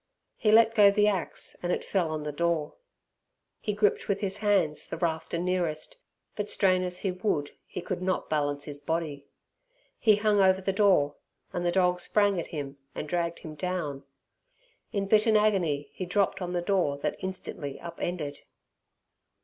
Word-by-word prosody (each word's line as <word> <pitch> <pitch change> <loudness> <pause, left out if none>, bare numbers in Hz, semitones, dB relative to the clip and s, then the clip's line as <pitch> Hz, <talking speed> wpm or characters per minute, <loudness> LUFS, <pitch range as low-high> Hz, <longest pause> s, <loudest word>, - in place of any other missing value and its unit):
He 215 - +2
let 225 +1 +6
go 205 -3 +7
the 210 +1 +3
axe 195 -4 -2
and 175 - -1
it - - -1
fell 180 -5 0
on 155 -1 -3
the 150 - -3
door. 165 0 0 0.9
He 210 - -2
gripped 205 -1 +2
with 200 -1 0
his 200 -1 -1
hand 200 -7 +2
the - - -4
rafter 165 -1 -1
nearest, 175 -3 -2 0.4
but 210 -1 -3
strain 185 -2 +3
as 180 0 -3
he 195 - 0
would 180 -6 -1 0.2
he - - -5
could 175 - -4
not 185 0 -1
balance 145 -2 0
his 145 -1 -5
body. 145 -2 -3 0.7
He 215 -2 +5
hung 210 -1 +3
over 190 0 +5
the 195 0 -1
door, 190 -8 +3 0.4
and 175 - -2
the 175 - +2
dog 180 -1 +2
sprang 200 +1 +2
at 170 - -4
him 140 -3 -6 0.2
and 150 - -4
dragged 170 +1 -1
him 155 - -8
down. 155 -4 -3 0.9
In 200 -3 -1
bitten 215 +2 +4
agony, 170 -10 +1
he 185 - -5
dropped 200 +1 +1
on 180 0 -3
the 175 -1 -1
door 175 -7 +1
that - - -2
instantly 180 -6 -5
up 170 0 -9
ended. 150 -5 -3
180 Hz, 175 wpm, -28 LUFS, 155-200 Hz, 0.9 s, go